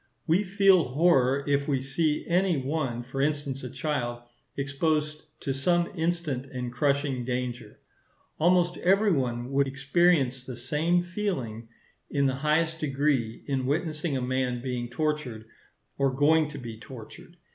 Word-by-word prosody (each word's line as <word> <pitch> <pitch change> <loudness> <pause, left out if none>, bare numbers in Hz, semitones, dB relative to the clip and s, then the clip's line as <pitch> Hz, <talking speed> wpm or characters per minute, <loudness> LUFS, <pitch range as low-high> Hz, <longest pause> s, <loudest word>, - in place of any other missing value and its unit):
We 170 +5 +3
feel 195 -3 +4
horror 135 -1 +3
if 140 0 +1
we 140 -3 +1
see 150 +3 0
any 180 -1 +2
one, 135 -3 -2
for 130 +2 -4
instance 145 -2 -1
a 125 - -5
child, 120 -5 -3 0.3
exposed 150 +2 -1 0.2
to 135 - -1
some 170 +6 +1
instant 160 -6 -2
and 125 -2 -5
crushing 140 -1 0
danger. 125 -3 -4 0.6
Almost 175 +1 +3
every 200 +3 +3
one 125 -4 -1
would 140 0 +2
experience 140 -2 +2
the 130 -1 -7
same 150 +8 +1
feeling 145 - -3 0.4
in 140 -1 +1
the 135 - +2
highest 160 +3 +1
degree 135 -6 0
in 135 -2 -1
witnessing 155 0 -1
a - - -2
man 125 -1 -1
being 125 -1 -3
tortured 130 -5 -2 0.5
or 135 -1 +3
going 150 +3 +3
to 150 - -8
be 115 -4 -8
tortured. 120 -3 -12
140 Hz, 145 wpm, -27 LUFS, 130-160 Hz, 0.6 s, feel